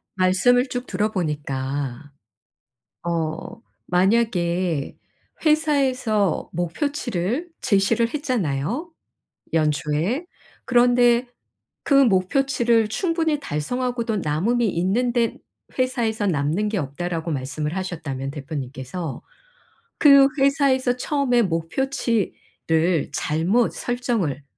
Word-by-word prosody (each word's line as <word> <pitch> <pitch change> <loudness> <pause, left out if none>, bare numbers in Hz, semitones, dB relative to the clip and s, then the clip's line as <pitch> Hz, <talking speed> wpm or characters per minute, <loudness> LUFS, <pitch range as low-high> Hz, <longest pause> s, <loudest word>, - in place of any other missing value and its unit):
말씀을 205 +8 +3
쭉 245 -1 -4
들어보니까 145 - -3 1.0
어 165 +4 -3 0.3
만약에 180 -5 +1 0.5
회사에서 265 - +1
목표치를 230 - -2
제시를 220 +4 +2
했잖아요 245 - -2 0.6
연초에. 155 - 0 0.4
그런데 245 0 +4 0.6
그 - - -1
목표치를 235 0 +3
충분히 325 - 0
달성하고도 240 - -2
남음이 200 +10 +1
있는데 230 +7 0 0.4
회사에서 235 -5 0
"남는 165 +5 0
게 210 - -1
없다."라고 165 +3 -3
말씀을 150 +4 -3
하셨다면 155 -8 -4
대표님께서. 140 +1 -6 0.8
'그 280 -2 +8
회사에서 270 -2 +3
처음에 250 -3 +1
목표치를 175 - -1
잘못 175 +12 +1
설정을 230 - -2
205 Hz, 225 characters per minute, -23 LUFS, 160-250 Hz, 1.0 s, 그